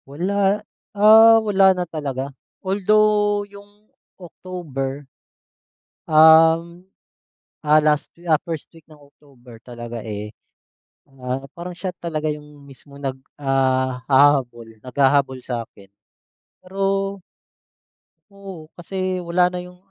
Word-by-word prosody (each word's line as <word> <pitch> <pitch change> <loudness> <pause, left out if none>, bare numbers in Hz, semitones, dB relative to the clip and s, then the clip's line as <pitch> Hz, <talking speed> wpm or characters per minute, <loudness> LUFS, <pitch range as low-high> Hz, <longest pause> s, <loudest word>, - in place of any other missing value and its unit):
Wala, 195 +7 -1 0.3
ah, 220 +2 +7
wala 190 -2 +4
na 180 - -2
talaga. 140 -4 -5 0.3
Although 205 +1 +2
yung 205 +1 -17 0.3
October, 150 -6 -7 1.0
um, 160 +3 +5 0.7
ah, 150 0 +4
last 150 -1 +1
week, 175 - -16
ah, 155 -2 +3
first 165 -3 -6
week 165 - -16
ng 155 - -16
October 135 -5 -19
talaga, 120 -2 -8
eh, 105 0 -7 0.8
ah, 130 0 -5
parang 175 +1 -8
siya 180 +2 -5
talaga 155 -2 -3
yung 150 -1 -10
mismong 140 +1 -16
nag 135 -1 -4 0.2
ah, 130 -2 -1
hahabol, 130 -5 +2
naghahabol 135 +1 0
sa 120 -3 -5
akin. 100 -1 -20 0.7
Pero 185 +2 -12 1.5
oo, 195 -5 -11
kasi 185 +1 -4
wala 180 +1 +1
na 180 - -4
yung, 180 0 -13
155 Hz, 110 wpm, -21 LUFS, 135-185 Hz, 1.5 s, ah